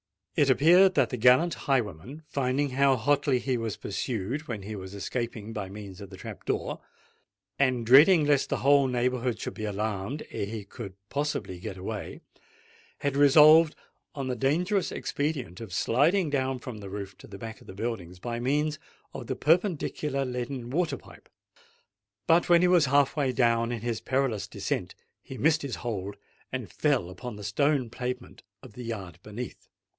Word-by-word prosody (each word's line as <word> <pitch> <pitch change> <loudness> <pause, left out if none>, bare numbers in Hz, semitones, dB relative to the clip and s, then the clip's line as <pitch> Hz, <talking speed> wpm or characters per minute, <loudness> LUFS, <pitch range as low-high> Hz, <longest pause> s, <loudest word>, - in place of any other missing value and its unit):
It 145 - +3
appeared 175 +7 +6
that - - +3
the 125 - -2
gallant 125 +9 +5
highwayman, 130 - -2
finding 140 0 -1
how 135 +1 +4
hotly 140 +2 +2
he 130 +1 -1
was 115 -3 -3
pursued 120 +8 -3
when 110 -5 -5
he 105 +2 -6
was 95 0 -8
escaping 115 +1 -4
by 100 -3 -4
means 100 -2 -9
of 100 - -9
the 95 - -11
trap - - -9
door, - - -2 0.8
and 130 -4 +2
dreading 150 +7 +7
lest 145 -2 +2
the 140 - -1
whole 140 +2 +5
neighbourhood 125 -1 0
should - - -4
be 110 - -5
alarmed 105 +5 -3
ere 100 - -3
he 110 0 -5
could 100 -1 -9
possibly 140 -10 -2
get 95 0 -6
away, 100 +2 -6 0.8
had 140 -1 -1
resolved 150 +3 +7 0.4
on 135 -2 -3
the 125 - -1
dangerous 175 - +1
expedient 135 - -3
of 110 -5 -8
sliding 150 - +2
down 130 -2 0
from 120 -3 -8
the 100 -1 -8
roof 100 -1 -6
to - - -13
the 100 - -9
back 110 +2 -8
of - - -17
the 95 - -10
buildings, 100 -5 -4
by 120 +5 -4
means 150 +4 0 0.3
of - - -7
the - - -2
perpendicular 155 -5 +1
leaden 125 0 -4
water 170 +3 0
pipe. - - -17 1.0
But 165 +2 +3
when 175 0 +6
he - - +5
was 175 -4 +5
half 140 +1 +3
way 140 -4 +1
down 115 -2 +2
in 120 -3 -3
his 120 -1 -2
perilous 130 -5 0
descent, - - -3 0.3
he 130 - -9
missed 155 +2 +3
his 140 -3 -4
hold, 100 -4 -4 0.4
and 125 -9 -5
fell 125 - +1
upon 110 +5 -7
the 105 - -9
stone 130 +4 +1
pavement 125 0 -5 0.2
of 125 -5 -12
the 125 - -8
yard 95 -7 -6
beneath. 105 +5 -8
125 Hz, 175 wpm, -28 LUFS, 110-145 Hz, 1.0 s, dreading